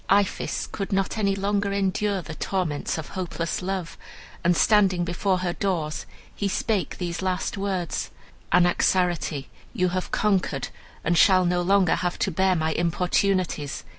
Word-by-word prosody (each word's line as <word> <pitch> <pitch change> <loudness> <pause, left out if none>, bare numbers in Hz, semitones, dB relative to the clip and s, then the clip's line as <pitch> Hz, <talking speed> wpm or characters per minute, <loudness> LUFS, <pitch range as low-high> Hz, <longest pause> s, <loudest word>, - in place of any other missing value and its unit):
"Iphis 200 0 +1
could 195 - -5
not 195 -1 0
any 200 -2 +2
longer 200 0 0
endure 200 0 0
the 160 - -7
torments 165 -4 -2
of 160 - -6
hopeless 170 -3 -3
love, 185 -2 -4 0.4
and, 175 0 +3
standing 195 -5 +4
before 185 +2 0
her 175 - 0
doors, 170 -7 -2 0.3
he 205 - -1
spake 205 0 -1
these 175 -1 -3
last 185 -1 -1
words: 195 -4 -2 0.4
'Anaxarete, 175 -4 +2 0.3
you 185 -6 +1
have 185 +1 -3
conquered, 190 -9 0 0.3
and 170 - +2
shall 185 +1 +5
no 175 0 +1
longer 190 -1 +3
have 175 -1 -1
to 195 - 0
bear 190 +2 +2
my 160 -1 0
importunities. 175 -3 0
185 Hz, 145 wpm, -25 LUFS, 175-195 Hz, 0.4 s, shall